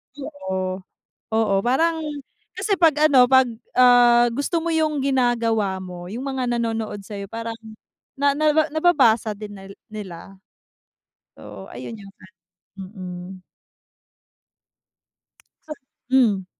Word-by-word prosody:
Oo, 190 -10 -4 0.6
oo, 220 -3 +2
parang 320 +7 +1 0.6
kasi 400 -3 -1
'pag 320 -4 +5 0.2
ano, 250 -2 +6
'pag, 260 -1 +5 0.3
ah, 240 -1 +6
gusto 305 +6 -2
mo 335 - -1
yung 310 -3 0
ginagawa 230 -7 +1
mo, 175 -1 -9
yung 235 +7 -6
mga 260 -3 -2
nanonood 225 -3 -3
sa'yo, 200 -1 -7
parang 230 +1 -6 0.6
na, 280 +1 +2
naba 305 +1 +2
nababasa 255 -10 +3
din 210 0 -9
nal 195 0 -11 0.2
nila. 195 -2 -9 0.9
So, 100 +3 -11
ayun, 125 - -8
yung 195 -1 -13
ano, 190 0 -16 0.4
mm. 185 -1 -9 2.3
So 305 - -5 0.4
hmm? 220 -8 +3
230 Hz, 110 wpm, -22 LUFS, 195-270 Hz, 2.3 s, ano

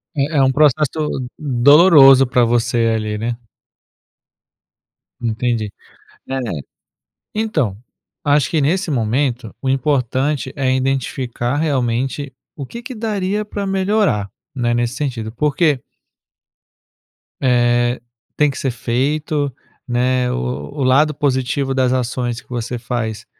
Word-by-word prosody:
É 145 +2 0
é 140 - +5
um 130 0 +3
processo 150 +1 +2
u 130 - -3
doloroso 140 0 +6
pra 125 0 +3
você 120 0 +1
ali, 110 -1 -2
né. 115 +2 -2 1.8
Entendi. 115 -2 -1 0.6
É. 135 - -3 1.0
Então, 160 - 0 0.5
acho 145 -2 +3
que 160 - +1
nesse 170 +5 0
momento, 125 +1 -1
o 135 - -3
importante 135 0 0
é 135 -2 +1
identificar 130 -1 -1
realmente 135 -1 -1 0.2
o 140 - -5
que 235 - -9
que 255 +1 -7
daria 210 -2 -2
pra 205 -1 -4
melhorar, 195 - +1 0.3
né, 120 -3 0
nesse 120 +1 0
sentido, 120 -7 -3
porque 150 +2 +1 1.6
Eh, 120 -1 +2 0.4
tem 150 -1 +3
que 135 - -7
ser 135 - -1
feito, 140 +5 -1 0.3
né, 125 0 +1
o - - -1
o 65 - -4
o - - +1
lado 150 +4 +4
positivo 135 -1 0
das 130 -1 +2
ações 120 -1 -2
que - - -28
você 120 0 -4
faz 115 -3 -4
130 Hz, 125 wpm, -18 LUFS, 120-150 Hz, 1.8 s, doloroso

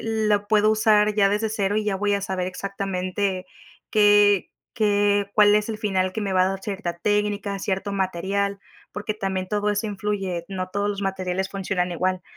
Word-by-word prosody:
lo 215 -2 +1
puedo 215 0 +4
usar 215 -1 +3
ya 200 -2 +5
desde 210 +2 0
cero 205 -2 -1
y 215 - +1
ya 205 -2 0
voy 205 +1 +1
a 200 - -1
saber 190 -2 -2
exactamente 190 0 -3 0.5
qué 205 -2 +4 0.2
qué 205 -2 +2
cuál 210 -1 +6
es 210 +1 -1
el 220 - -3
final 190 -4 0
que 220 - -4
me 200 -2 -2
va 185 -1 +4
a - - +1
dar 195 0 -4
cierta 195 -4 -4
técnica, 205 +1 0
cierto 195 +1 -2
material 195 +1 -1 0.3
porque 210 +1 -3
también 190 -2 -3
todo 210 0 0
eso 205 +2 -1
influye, 195 -4 -3
no 185 -2 -4
todos 200 +2 -1
los 205 -1 -3
materiales 190 -1 -2
funcionan 185 -2 -2
igual. 185 +1 -1
200 Hz, 185 wpm, -23 LUFS, 190-210 Hz, 0.5 s, cuál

